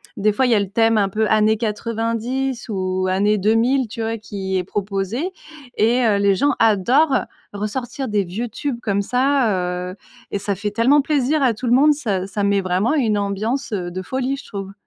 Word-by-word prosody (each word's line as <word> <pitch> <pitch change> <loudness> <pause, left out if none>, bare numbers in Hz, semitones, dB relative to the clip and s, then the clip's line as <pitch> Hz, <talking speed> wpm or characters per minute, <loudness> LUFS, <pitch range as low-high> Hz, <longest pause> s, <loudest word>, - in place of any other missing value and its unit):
des 215 -1 +2
fois 235 +6 +1
il 250 - +2
y - - +5
a 210 - +3
le 200 - -2
thème 225 +1 +3
un 195 -1 +1
peu 215 +2 0
années 215 0 +3
quatre-vingt-dix 230 +4 -2
ou 185 -2 -1
années 205 +3 +2
deux-mille, 230 +5 +2
tu 230 - -7
vois? 225 +1 -2
Qui 190 -2 -4
est - - -2
proposé 200 - -3 0.4
et 235 +3 +2
heu, 210 -3 +3
les 200 -1 +3
gens 285 +8 +2
adorent 240 +8 +3 0.3
ressortir 240 +6 -4
des 205 -2 +1
vieux 205 +7 -4
tubes 240 +2 -4
comme 200 -4 0
ça, 205 -8 0
heu - - -10 0.4
et - - -1
ça 200 +1 -2
fait 205 +3 -3
tellement 255 +7 +4
plaisir 290 +1 +1
à 255 -4 +3
tout 245 - -6
le 240 - +2
monde 295 +4 +5
ça 200 -10 -2
ça 205 +1 -3
met 200 0 +2
vraiment 185 +7 0
une 230 -9 +1
ambiance, 215 +6 -2
heu, 180 -4 -2
de 185 +2 -5
folie 260 +5 -2
je - - -11
trouve. 195 -2 -7
215 Hz, 205 wpm, -20 LUFS, 200-250 Hz, 0.4 s, y